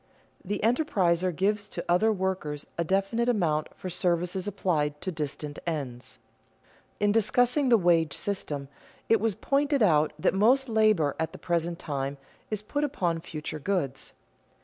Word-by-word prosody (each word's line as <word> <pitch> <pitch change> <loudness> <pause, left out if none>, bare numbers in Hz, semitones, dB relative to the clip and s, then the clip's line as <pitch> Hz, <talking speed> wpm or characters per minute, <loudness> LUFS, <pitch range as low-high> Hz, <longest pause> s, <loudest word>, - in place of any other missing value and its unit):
The 205 +1 -3
enterpriser 190 - +2
gives 205 +5 0
to - - -6
other 180 +6 +4
workers 185 -7 -2
a 170 - 0
definite 195 +7 +1
amount 160 -9 +1
for - - -7
services 180 +1 -1
applied 155 -7 -1
to 185 - -3
distant 150 -2 -5
ends. 135 -7 -4 0.8
In 205 0 +3
discussing 245 +5 +2
the 235 - +7
wage 170 -5 +3
system 150 -8 -3 0.4
it 225 -3 +4
was 220 -3 +1
pointed 280 +1 +1
out 155 -5 +4
that 155 - +1
most 250 +7 +4
labor 215 - +3
at 160 - -2
the - - -8
present 170 -1 -1
time 140 -3 -3 0.3
is 210 -1 -3
put 290 +7 -2
upon 180 - 0
future 155 -1 -6
goods. 150 -6 -2
185 Hz, 150 wpm, -28 LUFS, 155-215 Hz, 0.8 s, the